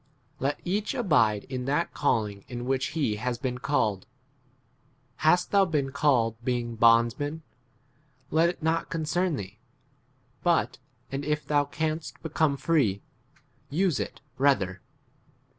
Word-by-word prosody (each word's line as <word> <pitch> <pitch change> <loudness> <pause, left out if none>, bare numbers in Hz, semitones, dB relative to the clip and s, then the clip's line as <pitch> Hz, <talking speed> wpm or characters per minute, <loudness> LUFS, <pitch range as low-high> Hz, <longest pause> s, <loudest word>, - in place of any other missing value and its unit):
Let 140 +2 -1
each 205 +8 -1
abide 115 - +2
in 130 -2 -5
that 145 +5 0
calling 105 -8 0
iu 120 -1 -5
which 130 0 0
he 145 -7 +2
21 105 - -6
has 125 -1 0
been 125 -1 -3
called. 110 -9 0 1.1
Hast 175 +3 +3
thou 200 -1 +5
been 145 -6 -1
called 120 -5 +1
[being] 120 -1 -1
bondsman, 120 +7 +3 0.9
let 165 +2 +4
it 175 - -7
not 165 +1 0
concern 165 +2 0
thee; 100 -3 -7 0.8
but 170 -8 +1 0.3
and 135 +1 -3
if 150 +1 -1
thou 145 -1 +2
canst 155 +2 -3
become 155 -2 +1
free, 130 -12 +1 0.7
use 170 +1 +1
[it] - - -5 0.2
rather. 100 -10 +2
140 Hz, 130 wpm, -27 LUFS, 120-160 Hz, 1.1 s, thou